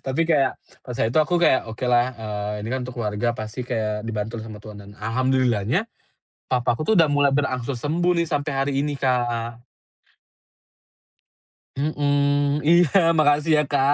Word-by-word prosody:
Tapi 135 +5 +1
kayak, 150 -5 +2 0.2
pas 125 -2 -8
itu 115 +7 +1
aku 165 +3 +1
kayak, 170 -8 +2
"Okelah, 120 +2 +1
eee, 105 -2 -4
ini - - -5
kan 130 - -1
untuk 125 - -9
keluarga 115 +1 -1
pasti 110 +3 -6
kayak 110 -3 -3
dibantu 110 +1 -4
sama 110 -1 -9
Tuhan," 105 -1 -10
dan 100 0 -13
alhamdulillah-nya 125 - 0 0.7
papaku 125 +2 0
tuh 220 - +2
udah 165 - +6
mulai 145 -1 +2
berangsur 130 -2 -1
sembuh 170 +6 0
nih 170 0 +1
sampai 145 0 -2
hari 135 +1 -1
ini, 145 0 -2
Kak. 120 -2 -1 2.1
Mhm, 145 0 +1
iya 175 +2 +5 0.2
makasih 150 +1 +3
ya, - - +4
Kak. 140 0 +2
130 Hz, 150 wpm, -23 LUFS, 115-145 Hz, 2.1 s, udah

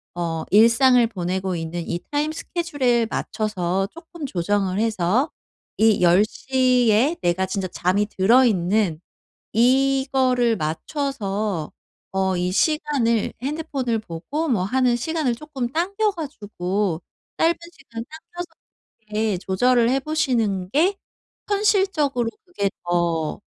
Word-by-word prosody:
어 165 -2 -2
일상을 235 +3 +6
보내고 185 -2 -2
있는 165 +1 -4
이 175 - -2
타임 295 +1 0
스케줄에 290 -9 0
맞춰서 195 -3 -1
쪼끔 335 -1 -9
조정을 195 -1 0
해서 225 - +1 0.5
이 220 -3 +4
10:00 245 +6 +3
에 260 +10 +3
내가 175 +2 +1
진짜 190 -1 -2
잠이 185 +4 0
들어 225 +6 +4
있는 185 -4 +1 0.5
이거를 260 -1 +3
맞춰서 200 - -3 0.4
어 190 -1 +1
이 180 +1 -1
시간을 275 - +1
핸드폰을 275 -6 -2
보고 220 - -4
뭐 205 -7 +1
하는 250 +4 +2
시간을 275 -1 -1
조금 275 -4 -5
당겨 395 +7 0
가지고 205 - -3 0.4
짧은 330 +1 +4 0.2
시간 230 -7 -9
당겨서 345 +3 -8 0.6
보게 210 -2 0
조절을 235 +6 +2
해 270 +2 +2
보시는 240 -11 0
게 350 - +3 0.5
현실적으로 380 - +1 0.2
그게 350 - -1 0.2
더 170 -1 0
230 Hz, 235 characters per minute, -22 LUFS, 190-275 Hz, 0.6 s, 일상을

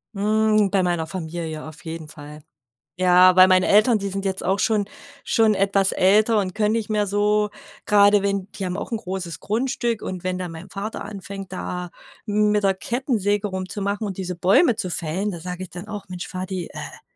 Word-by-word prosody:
Hm, 215 0 +2
bei 190 -1 +2
meiner 175 -3 -1
Familie 160 -2 -5
auf 155 0 -12
jeden 160 -1 -6
Fall. 150 0 -11 0.5
Ja, 185 0 +6
bei 185 +1 +8
meinen 185 0 +4
Eltern 215 +4 +4
die 200 -1 -3
sind 195 +1 -4
jetzt 190 -1 -2
auch 195 +2 +1
schon 215 -2 +1 0.4
schon 220 -2 +3
etwas 195 0 +2
älter 210 +4 +4
und 185 -2 -2
können 215 0 +1
nicht 225 -2 -2
mehr 210 -1 +1
so, 210 +1 +1 0.4
grade 205 0 +5
wenn 200 -1 -1
die 195 - -5
haben 180 +1 -3
auch - - -6
'n 230 - 0
großes 185 -5 -5
Grundstück 235 0 -1
und 185 -2 -5
wenn 185 0 -2
dann 180 -2 -5
mein 165 +4 -10
Vater 205 +4 -5
anfängt, 195 -1 -8
da 180 -1 -5 0.4
m 210 0 +2
mit 210 0 +1
der 195 -1 +3
Kettensäge 210 -3 -1
rumzumachen 200 +2 -3
und 195 -3 -5
diese 185 -2 -4
Bäume 195 - +4
zu 185 -4 -3
fällen, 175 +5 -2
da 170 - -7
sage 180 +2 -6
ich 185 - -9
dann 180 +4 -8
auch: 205 -3 -7
„Mensch, 180 0 -6
Vati, 185 -1 -5
äh, - - -10
195 Hz, 200 wpm, -23 LUFS, 180-210 Hz, 0.5 s, bei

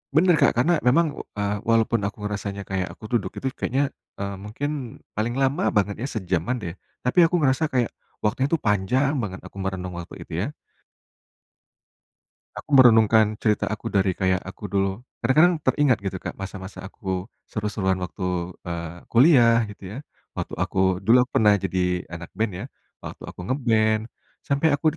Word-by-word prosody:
Benar, 175 +2 +5
Kak, - - +4
karena 170 +7 +4
memang, 145 +4 +2 0.2
eee, 100 0 0
walaupun 115 -1 +2
aku 100 +2 -3
ngerasanya 100 -1 -5
kayak 95 -1 -2
aku 110 - -10
duduk 115 - -1
itu 135 - -3
kayaknya, 135 +2 -1 0.2
eee, 100 0 -3
mungkin 115 +8 -3 0.5
paling 120 +5 -1
lama 140 +8 +2
banget 105 +2 0
ya - - -1
sejaman 95 +6 -1
deh. 85 -5 -5 0.3
Tapi 125 +8 +4
aku 170 +1 +3
ngerasa 145 +2 +2
kayak, 125 -3 +2 0.3
waktunya 110 +6 0
itu 165 - +2
panjang 115 +8 +1
banget 95 -3 -5
aku - - -14
merenung 90 -2 -4
waktu 85 -1 -7
itu - - -10
ya. 135 - -3 2.1
Aku 145 - -1
merenungkan 110 -4 +6
cerita 105 -2 +1
aku 105 - -4
dari 95 -1 +2
kayak 95 0 0
aku 95 +2 -8
dulu 95 0 0 0.2
kadang-kadang 165 +7 +5
teringat 130 -3 +3
gitu, 95 -1 -3
Kak, - - -6
masa-masa 95 0 -8
aku 95 -1 -4 0.2
seru-seruan 105 -3 -1
waktu, 90 -1 -3 0.2
eee, 85 0 -5
kuliah 120 -3 +6
gitu 105 - -14
ya, 110 - -7 0.4
waktu - - -4
aku 95 -1 +1
dulu 115 +6 +5
aku 125 - -12
pernah 105 -1 +6
jadi 90 -2 -1
anak 85 0 -7
band 110 +1 0
ya, - - -5 0.3
waktu - - -9
aku - - -13
nge-band, 110 -5 +2 0.4
sampai 140 +3 +1
aku 145 - -10
105 Hz, 165 wpm, -24 LUFS, 95-130 Hz, 2.1 s, merenungkan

